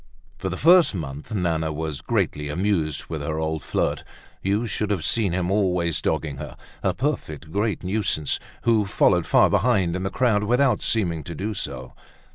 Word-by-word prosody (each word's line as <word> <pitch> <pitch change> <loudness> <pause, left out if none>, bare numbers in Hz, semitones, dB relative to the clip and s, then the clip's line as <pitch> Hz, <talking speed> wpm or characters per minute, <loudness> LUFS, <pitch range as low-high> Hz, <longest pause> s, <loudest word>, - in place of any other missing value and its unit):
For - - -2
the - - -4
first 170 - +6
month 70 -4 -6
Nana 85 -6 0
was 75 -1 -4
greatly 75 0 -1
amused 80 -2 0
with 80 -3 -5
her 75 +2 -3
old 80 -1 -2
flirt. - - -1 0.4
You 100 +4 0
should 105 -2 -2
have 95 -6 -1
seen 110 -6 +2
him 90 +1 -1
always 90 -5 +1
dogging 75 -3 -1
her—a 75 0 -5
perfect 80 - -3
great 105 +2 -1
nuisance, 90 -6 0 0.2
who 110 -4 +3
followed - - +3
far - - +5
behind, 95 -9 +2
in 95 - -2
the 95 - -1
crowd, 110 -3 +2
without 125 0 +2
seeming 85 -8 0
to 85 - -6
do 105 +6 -3
so. 95 - -5
90 Hz, 170 wpm, -24 LUFS, 80-105 Hz, 0.4 s, first